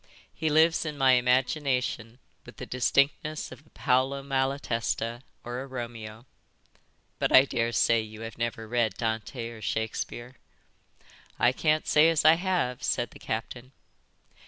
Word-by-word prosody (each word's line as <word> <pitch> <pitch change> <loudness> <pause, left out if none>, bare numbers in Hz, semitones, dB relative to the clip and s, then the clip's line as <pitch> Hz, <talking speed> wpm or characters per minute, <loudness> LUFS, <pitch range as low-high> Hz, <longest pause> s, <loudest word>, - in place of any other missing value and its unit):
He 160 0 -1
lives 160 +2 +4
in 150 -2 -5
my 135 -1 +5
imagination 125 -2 +1 0.3
with - - -14
the - - -6
distinctness 140 +4 0
of 150 - -13
a - - -23
Paolo 130 +2 0
Malatesta 130 -4 -1 0.2
or 120 +1 -5
a 135 - -7
Romeo. 115 -3 -7 0.9
But - - 0
I 130 - +8
daresay 115 -2 +1
you 110 0 -10
have 115 0 -7
never 115 -1 -3
read 115 -3 0
Dante 115 +1 -3
or 115 -2 -11
Shakespeare?" 115 +3 -4 1.0
"I 120 - +4
can't 155 +3 +1
say 155 +2 +5
as 160 -2 +1
I 155 - +9
have," 175 -8 -1
said 120 - -1
the - - -14
captain. 120 +3 -5
125 Hz, 140 wpm, -27 LUFS, 115-140 Hz, 1.0 s, I